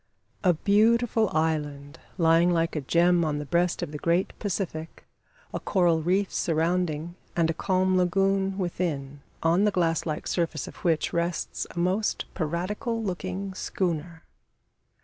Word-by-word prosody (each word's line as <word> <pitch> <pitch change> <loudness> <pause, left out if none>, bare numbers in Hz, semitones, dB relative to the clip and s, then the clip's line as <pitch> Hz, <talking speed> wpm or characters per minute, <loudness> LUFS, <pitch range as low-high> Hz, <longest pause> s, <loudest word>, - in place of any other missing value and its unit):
A 180 -3 +4
beautiful 220 +4 +3
island 150 -2 -2 0.2
lying 165 0 +4
like 165 -1 +1
a 150 - -1
gem 170 +4 +3
on 150 -2 0
the 150 - -4
breast 175 +3 +1
of - - -4
the 150 - -6
great 170 +4 +1
Pacific 170 -5 -4 0.5
a - - -2
coral 175 -4 +2
reef 185 +4 +1
surrounding, 165 0 0 0.2
and 165 -1 +2
a - - -3
calm 185 +2 +1
lagoon 195 +1 +1
within, 155 -7 -3 0.2
on 170 +4 +3
the 210 - +4
glass 170 -4 0
like 155 -1 -3
surface 165 -5 -1
of - - -10
which 165 -3 0
rests 170 -1 -2
a - - -13
most 185 +5 0
piratical 195 - -2
looking 190 0 -4
schooner. 170 -3 -3
175 Hz, 145 wpm, -26 LUFS, 160-190 Hz, 0.5 s, A